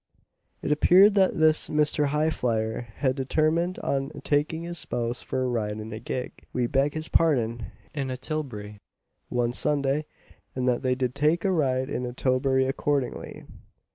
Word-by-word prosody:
It - - -1
appeared 185 +7 +6
that 190 -2 +3
this 155 -1 +4
Mr. 150 -1 +2
Highflyer 125 -7 0
had 130 -3 0
determined 155 +6 +1
on 135 0 -1
taking 155 +3 0
his 170 -1 -5
spouse 120 -2 -3
for 130 - -2
a - - 0
ride 110 -4 -1
in 110 +1 -7
a 110 - -5
gig 125 +2 -4 0.2
we 125 -1 +1
beg 140 +4 +1
his 155 0 -3
pardon, 120 -8 +1 0.3
in 140 -3 -3
a 130 - -3
tilbury, 125 -8 -5 0.5
one 120 -1 0
Sunday, 145 +2 0 0.5
and 130 -1 -1
that 125 -1 +2
they 130 -1 +1
did 125 -1 -1
take 150 +6 +1
a 195 - +3
ride 130 -6 +1
in 125 0 -2
a 120 - -6
tilbury 130 +1 +1
accordingly. 135 0 -2
135 Hz, 165 wpm, -26 LUFS, 125-155 Hz, 0.5 s, appeared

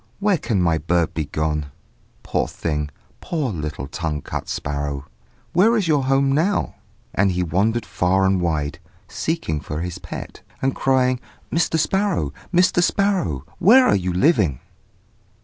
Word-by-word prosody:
where 200 -4 +2
can 110 -6 0
my 85 -3 +2
bird 85 +1 +1
be 80 - -2
gone? 75 0 -2 0.6
Poor - - 0
thing! 75 -2 -3 0.3
Poor 150 -8 -2
little 75 -4 -4
tongue 80 0 -3
cut - - -5
sparrow! 70 -1 -3 0.5
where 220 +7 +5
is 200 -5 0
your 145 -4 +2
home 135 +1 +3
now?" 170 +8 +1 0.4
and 100 -1 +2
he 90 0 0
wandered 105 +7 +1
far 95 +1 +1
and 95 -1 +2
wide, 75 -4 -1 0.3
seeking 160 - -2
for 75 +2 -5
his 90 0 -4
pet, - - -8 0.2
and 135 0 +1
crying, 130 -1 +2 0.3
"Mr. 165 -1 +1
Sparrow! 185 - 0 0.2
Mr. 180 0 +4
Sparrow! 180 - +1
where 235 +8 +7
are - - +4
you 90 -2 -1
living?" 90 - +2
95 Hz, 150 wpm, -22 LUFS, -, 0.6 s, where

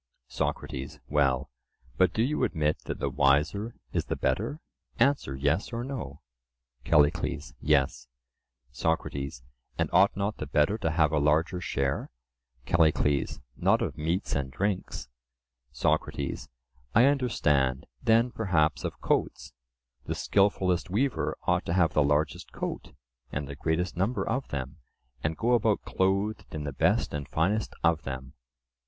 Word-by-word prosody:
SOCRATES: 70 -1 -3
Well, 70 -2 +1 0.4
but 95 - +4
do 110 - +1
you 150 +5 0
admit 75 -2 +1
that - - -4
the - - -2
wiser 75 +11 +2 0.2
is - - 0
the - - -2
better? 70 - -1 0.4
Answer 120 - +2
"Yes" 70 +8 0
or 120 0 -3
"No." 120 - -6 0.6
CALLICLES: 75 -2 +2
Yes. 70 -4 +1 0.6
SOCRATES: 70 -5 -2 0.3
And - - 0
ought - - +5
not 100 +2 -1
the 75 - -5
better 75 +9 +2
to 95 - 0
have 80 -2 +2
a 75 - +2
larger 80 +5 +2
share? 70 -4 -1 0.6
CALLICLES: 75 -4 +2
Not - - +2
of - - -3
meats 85 +6 -1
and 70 -2 -1
drinks. 95 -6 -2 0.6
SOCRATES: 65 +2 -1 0.5
I 115 +4 +7
understand: 75 - +2 0.2
then, 115 +2 +4
perhaps, 80 - +1
of - - -4
coats—the - - -4
skilfullest 95 -3 +2
weaver 125 +7 0
ought - - +2
to 85 - 0
have 90 -3 +3
the 75 - +4
largest 75 0 0
coat, - - -5 0.4
and 70 0 -3
the 70 - -6
greatest 85 +5 -1
number 100 +8 0
of 130 +4 -1
them, 70 +2 -5 0.5
and 80 +1 -1
go 120 +2 +2
about 110 -3 +2
clothed 100 +3 0
in 75 - -3
the 70 -2 -4
best - - +2
and 75 -1 -4
finest 100 +7 0
of 85 -2 +3
them? 65 -1 -6
80 Hz, 140 wpm, -28 LUFS, 70-100 Hz, 0.6 s, I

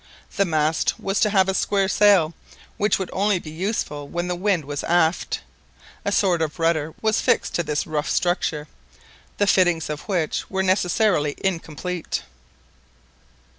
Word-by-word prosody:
This 200 -1 +2
mast 155 -1 +1
was 195 +1 -1
to 210 - +3
have 195 -2 +3
a 190 - +1
square 195 0 +1
sail, 195 -6 +4 0.4
which 205 0 +2
would 190 -2 -5
only 200 0 +2
be 155 -3 -8
useful 160 -5 -3
when 175 +3 -3
the 180 - -1
wind 180 -4 0
was 145 0 -4
aft. 170 0 +1 0.6
A 200 - -1
sort 185 -4 +2
of 155 +1 -2
rudder 165 -2 0
was 220 0 +2
fixed - - +1
to - - +1
this 150 -3 -2
rough 155 0 -2
structure, 160 -4 0 0.7
the 205 - +2
fittings 175 -5 +2
of 150 - -5
which 175 -6 -1
were 190 0 -1
necessarily 185 -4 +2
incomplete. 175 - -3
175 Hz, 155 wpm, -23 LUFS, 155-195 Hz, 0.7 s, sail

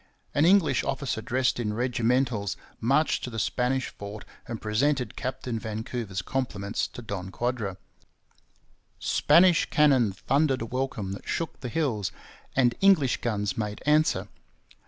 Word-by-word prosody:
An 145 - +3
English 185 -2 +4
officer 135 -4 -2
dressed 125 +3 0
in 105 -3 -1
regimentals 120 -3 0 0.2
marched 140 +7 +2
to - - -3
the 115 - -7
Spanish 125 +4 0
fort 105 +1 -9 0.2
and 115 -2 -5
presented 125 +2 0
Captain 130 -2 -3
Vancouver's 110 -3 -4
compliments 105 -6 -2
to 120 - -10
Don 95 -4 -5
Quadra. 110 -3 -2 1.2
Spanish 175 -1 +4
cannon 135 -8 +4
thundered 135 - +1
a - - -3
welcome 125 -5 -3
that 100 - -8
shook 165 - -3
the 125 - -5
hills, 115 - -1 0.4
and 125 -3 +4
English 180 - +5
guns 105 -5 -1
made 105 -2 -4
answer. 150 +1 +3
120 Hz, 135 wpm, -27 LUFS, 105-135 Hz, 1.2 s, English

